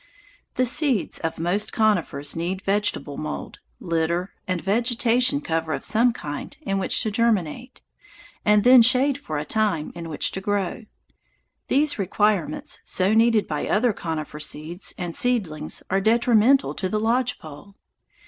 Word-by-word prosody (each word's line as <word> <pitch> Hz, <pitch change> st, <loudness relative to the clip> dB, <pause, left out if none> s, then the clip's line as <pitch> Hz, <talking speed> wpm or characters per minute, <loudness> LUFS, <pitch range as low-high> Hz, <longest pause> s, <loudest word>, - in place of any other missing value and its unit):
The 255 Hz, -, +2 dB
seeds 255 Hz, -, 0 dB
of 165 Hz, -, -3 dB
most 180 Hz, +6 st, -1 dB
conifers 170 Hz, -10 st, 0 dB
need 180 Hz, +4 st, -3 dB
vegetable 195 Hz, -7 st, -1 dB
mould, 155 Hz, 0 st, -6 dB, 0.2 s
litter, 170 Hz, +2 st, -1 dB, 0.2 s
or 185 Hz, -, +1 dB
vegetation 235 Hz, -, +1 dB
cover 160 Hz, 0 st, -2 dB
of 135 Hz, -, -5 dB
some 230 Hz, +4 st, +3 dB
kind 145 Hz, -9 st, -7 dB
in 195 Hz, -7 st, -1 dB
which 190 Hz, -, +2 dB
to 220 Hz, -, -1 dB
germinate, 230 Hz, -, -1 dB, 0.6 s
and 210 Hz, -1 st, +4 dB
then 250 Hz, 0 st, +8 dB
shade 255 Hz, +4 st, +3 dB
for 155 Hz, -, -5 dB
a 150 Hz, -, -3 dB
time 205 Hz, -8 st, 0 dB
in 170 Hz, -1 st, -7 dB
which 150 Hz, -, -1 dB
to 190 Hz, -, -4 dB
grow. 205 Hz, +1 st, -2 dB, 0.8 s
These 290 Hz, -2 st, +1 dB
requirements 205 Hz, -1 st, 0 dB
so 190 Hz, +3 st, +1 dB
needed 225 Hz, -1 st, +3 dB
by 150 Hz, -2 st, -3 dB
other 225 Hz, +1 st, +2 dB
conifer 155 Hz, -4 st, -5 dB
seeds 160 Hz, +5 st, -4 dB
and 175 Hz, -2 st, -4 dB
seedlings 180 Hz, -12 st, -1 dB
are 195 Hz, +1 st, +2 dB
detrimental 235 Hz, +4 st, +3 dB
to 185 Hz, -, -3 dB
the 215 Hz, -, -1 dB
lodge 240 Hz, +3 st, 0 dB
pole. 155 Hz, +6 st, -12 dB
200 Hz, 150 wpm, -23 LUFS, 165-235 Hz, 0.8 s, then